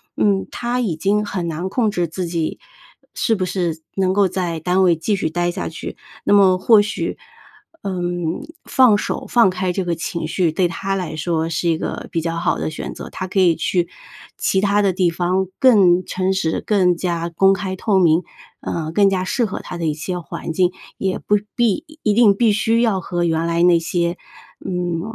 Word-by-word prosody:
嗯， 200 -2 +1
他 240 +1 -2
已 210 -10 -1
经 205 +5 +1
很 185 -4 -3
难 165 +3 -3
控 220 +2 0
制 175 -4 -1
自 180 +3 -4
己 165 -2 -2 0.5
是 225 - +1
不 190 - -2
是 175 -3 -2 0.2
能 190 -1 +2
够 200 -1 +3
在 175 -3 -3
单 180 +3 +1
位 180 -3 +4
继 195 +6 -1
续 160 - -1
待 175 +2 -1
下 - - -4
去。 - - -7 0.3
那 - - +2
么 195 -2 +5
或 210 +3 +5
许， 205 - -3 0.6
呃， 200 - -3 0.7
放 255 -6 +5
手 - - -3
放 235 -5 +5
开 185 0 -1
这 185 +2 -2
个 170 -1 -1
情 165 0 -4
绪 165 +1 +1
对 180 +3 +1
他 195 +3 -3
来 180 -4 -4
说 160 +1 -1
是 165 +1 -2
一 165 - +2
个 - - -5
比 165 - 0
较 165 0 -2
好 170 - 0
的 - - -2
选 155 - -6
择， - - -8
他 185 - -5
可 190 +1 -1
以 175 -3 +4
去 175 0 0 0.5
其 190 - +1
它 205 +1 +2
的 200 -2 +2
地 185 -1 +1
方 180 +3 0
更 190 -8 +5
诚 190 0 -1
实， 165 -4 -1
更 185 -4 +3
加 170 -1 -2
公 195 +4 +4
开 190 0 -4
透 205 0 +1
明， 170 -2 +4 0.4
呃， 160 -1 -4
更 200 +4 +4
加 185 -1 0
适 235 +6 0
合 195 - -4
他 - - -7
的 170 - -3
一 155 - +1
些 180 +4 -4
环 165 - -6
境。 180 +2 +1 0.2
也 190 -1 -1
不 210 - +2 0.2
必 235 - +1 0.2
一 210 - +2
定 210 -2 +5
必 225 +1 +3
须 225 +2 +2
要 220 -5 +2
和 175 -1 -2
原 165 -1 0
来 170 0 +1
那 175 -1 +5
些， 170 +1 -1 0.5
嗯， 175 -2 -2
185 Hz, 220 characters per minute, -20 LUFS, 170-200 Hz, 0.7 s, 么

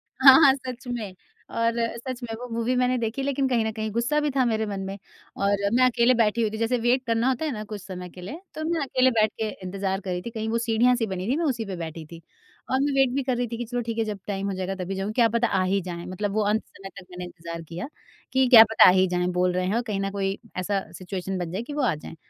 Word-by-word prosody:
हाँ, 265 0 +6
हाँ 270 -2 +8
सच 255 -1 -8
में 230 -6 -4 0.5
और 230 0 +2 0.2
सच 255 +1 -6
में 230 -2 -5
वो 250 - -6
मूवी 235 +2 0
मैंने 250 0 +2
देखी 235 +3 -2
लेकिन 275 -1 0
कहीं 240 -3 +2
न 220 - -1
कहीं 220 0 -3
गुस्सा 235 +7 +1
भी 295 - 0
था 265 -1 +2
मेरे 220 -2 0
मन 200 -2 -4
में। 195 +1 -5 0.4
और 200 0 +1
मैं 255 +1 +5
अकेले 245 0 +4
बैठे 230 -1 +2
हुई 220 - +2
थी 220 - -5
जैसे 230 +3 +1
वेट 245 +3 +2
करना 230 +1 +1
होता 265 +4 -1
है 305 - -1
ना 215 -4 -5
कुछ 210 -2 -7
समय 180 -2 -8
के 180 - -12
लिए, 295 - -7
तो 310 - -4
मैं 335 -3 0
अकेले 260 -1 +2
बैठ 215 -2 +2
के 220 - 0
इंतज़ार 190 +1 -2
कर 195 - -7
रही 180 0 -2
थी 235 - -6
कहीं 220 -1 -4
वो 230 - +1
सीढ़ियाँ 235 +1 +3
सी 235 -2 0
बनी 190 -1 -4
थी 265 - +2
मैं 335 - 0
उसी 240 -6 -1
पे 195 -2 -5
बैठी 165 -1 -6
थी। 165 0 -10 0.5
और 260 - +2
मैं 280 +1 +1
वेट 270 -1 +4
भी 275 - 0
कर 255 -2 -1
रही 245 0 -1
थी 230 0 -5
कि 240 - -4
चलो 245 +1 -3
ठीक 230 -1 -4
है 225 - +2
जब 210 -2 -4
टाइम 200 -1 -2
हो - - -2
जाएगा 190 +1 -3
तभी 190 +2 -4
जाऊँगी 195 +3 -3
क्या 230 - +6
पता 235 +1 +1
आ 190 -3 +1
ही 195 +1 +1
जाएँ। 175 -1 -6
मतलब 195 +2 -3
वो 215 - +1
अंत 215 +2 +1
समय 195 0 -11
तक 180 - -14
मैंने 180 0 -6
इंतज़ार 170 -1 -8
किया 170 +7 -5 0.5
कि 260 0 +4
क्या 230 -3 +11
पता 225 - +7
आ - - +10
ही 185 0 +3
जाएँ, 180 0 0
बोल 180 0 +1
रहे 180 0 0
हैं 195 +4 0
और 235 - +2
कहीं 210 -5 -3
ना 195 0 -2
कोई 195 0 -2 0.2
ऐसा 195 +2 0
सिचुएशन 190 0 -5
बन 175 -2 -4
जाए 190 +4 -3
कि 290 - -7
वो 295 - -1
आ 225 -8 +2
जाएँ। 150 - -10
220 Hz, 290 wpm, -25 LUFS, 190-245 Hz, 0.5 s, क्या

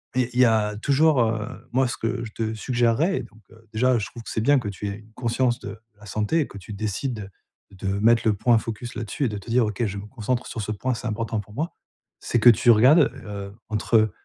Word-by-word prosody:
et 125 -2 +1
il 125 - -1
y 130 - +8
a 110 -2 +2
toujours, 140 +4 +3
heu, 110 -2 -2
moi 130 +1 +3
ce - - -3
que 115 +1 -2
je 110 - -9
te 110 0 -3
suggérerais 120 - +1
donc, 115 -1 -16
heu, 115 0 -19
déjà, 125 +3 +3
je 105 - -3
trouve 120 -2 -11
que - - -9
c'est 110 - -1
bien 145 +5 +4
que 110 -4 -4
tu 100 +1 -5
aies 100 +1 -5
une 110 +1 -20
conscience 120 +1 0
de - - -8 0.2
la 105 - -14
santé 105 - 0
et 145 - -2
que - - -11
tu 100 +3 -9
décides 110 +1 -3 0.4
de 95 0 -7
mettre 115 +2 +4
le 110 - +4
point 115 +4 +3
focus 115 +2 -6
là-dessus 115 +5 -3
et - - +1
de 105 - -4
te 100 - -11
dire: 120 0 +3
«OK, 105 +2 -2
je 100 -1 -4
me 100 - -7
concentre 120 +1 -3
sur 115 - -5
ce 105 - -3
point, 125 +5 -1
c'est 125 +1 -5
important 110 0 -2
pour 105 +1 -16
moi». 155 +9 -3 0.5
C'est 120 - 0
que 120 - +8
tu 120 +1 +6
regardes, 125 +9 +6
heu, 100 -1 -6 0.2
entre 110 0 +2
115 Hz, 250 wpm, -24 LUFS, 105-125 Hz, 0.5 s, y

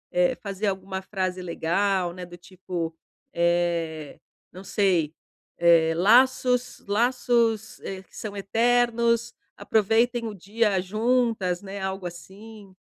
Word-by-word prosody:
é 180 0 +3
fazer 200 0 -4
alguma 190 0 -3
frase 185 -1 -3
legal, 180 +1 0
né, 180 0 -8
do 175 0 -10
tipo, 175 -2 -6 0.4
eh, 170 -3 -1 0.3
não 185 +2 -11
sei, 180 -7 +1 0.4
eh: 165 -1 +4
"Laços 250 +5 +3
laços, 230 0 +1
eh, 190 -1 -6
que - - -23
são 205 -2 -6
eternos, 235 +2 +1 0.2
aproveitem 230 +3 +1
o 215 - -6
dia 205 +1 0
juntas", 215 -2 0
né, 195 0 -7
algo 190 -1 -4
assim. 195 +3 -11
195 Hz, 115 wpm, -25 LUFS, 180-225 Hz, 0.4 s, eh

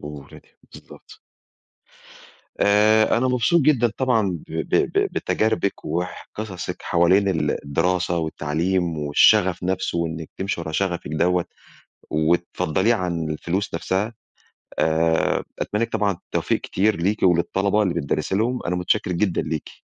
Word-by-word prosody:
وولادِك، 75 -1 -11
بالضبط. - - -14 1.4
آآ 110 +2 +4
أنا 130 - +1
مبسوط 130 +7 +2
جدًا 130 -6 +3
طبعًا 110 -9 +1
ب - - -13
ب 80 - -1
ب - - +2
بتجاربِك 110 -2 -1
وح 90 +3 -4
قصصِك 100 -4 -5
حوالين 95 +4 +3
ال 90 -4 0
الدراسة 90 +4 0
والتعليم 80 +2 -1
والشغف 90 +6 +3
نفسه 95 -1 -1
وإنِّك 80 -1 -3
تمشي 95 -2 -2
ورا 80 - -5
شغفِك 85 -2 -2
دوّة 90 +3 +1 0.6
وتفضّليه 85 +5 +1
عن 85 -6 -2
الفلوس 90 +6 -3
نفسها، 95 +6 -1 0.7
آآ 80 +1 +2 0.2
أتمنى 105 +2 -1
لِك - - -5
طبعًا 105 -1 +1
التوفيق 85 - -2
كتير 105 +3 +1
ليكِ 100 +6 -1
وللطلبة 95 +4 +2
اللي 95 -4 0
بتدرّسي 85 +4 -1
لهم، 120 +4 0
أنا 90 - 0
متشكِّر 90 +2 0
جدًا 90 0 0
ليكِ. 80 -1 -6
90 Hz, 130 wpm, -22 LUFS, 80-105 Hz, 1.4 s, آآ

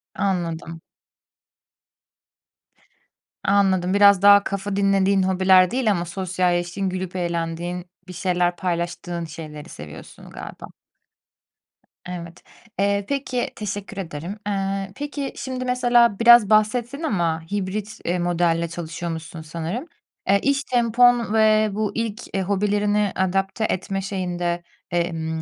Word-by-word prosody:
Anladım. 170 -4 -2 2.6
Anladım, 190 -2 +2
biraz 200 -1 +6
daha 200 0 +7
kafa 200 0 -3
dinlediğin 195 -1 +3
hobiler 185 -1 +4
değil 250 -3 +1
ama 175 -3 -1
sosyalleştiğin, 180 +1 -1
gülüp 185 0 -5
eğlendiğin, 175 0 -3 0.2
bir 180 - -8
şeyler 180 -1 0
paylaştığın 175 -1 -3
şeyleri 155 -2 -9
seviyorsun 75 0 -11
galiba. - - -9 1.4
Evet, 170 -1 -8 0.4
eee, 200 0 +1
peki, 260 -3 -1
teşekkür 205 -1 -5
ederim. 175 +3 -6
Eee, 195 -1 -2
peki, 285 -1 -4
şimdi 255 -1 -4
mesela 240 -4 +3
biraz 235 -3 +7
bahsettin 235 +7 +2
ama 170 - 0
hibrit, 205 +2 -3
eee, 175 +1 0
modelle 170 -1 +1
çalışıyormuşsun 165 -1 -6
sanırım. 165 - -5 0.4
Eee, 200 +1 +4
iş 280 0 +1
tempon 240 -2 +3
ve 215 -1 +4
bu 210 0 -1
ilk, 230 0 -3
eee, 195 - 0
hobilerini 205 +1 +1
adapte 195 +3 0
etme 195 +1 -2
şeyinde, 175 -3 -2 0.3
emm 165 -2 -2
195 Hz, 110 wpm, -23 LUFS, 175-210 Hz, 2.6 s, daha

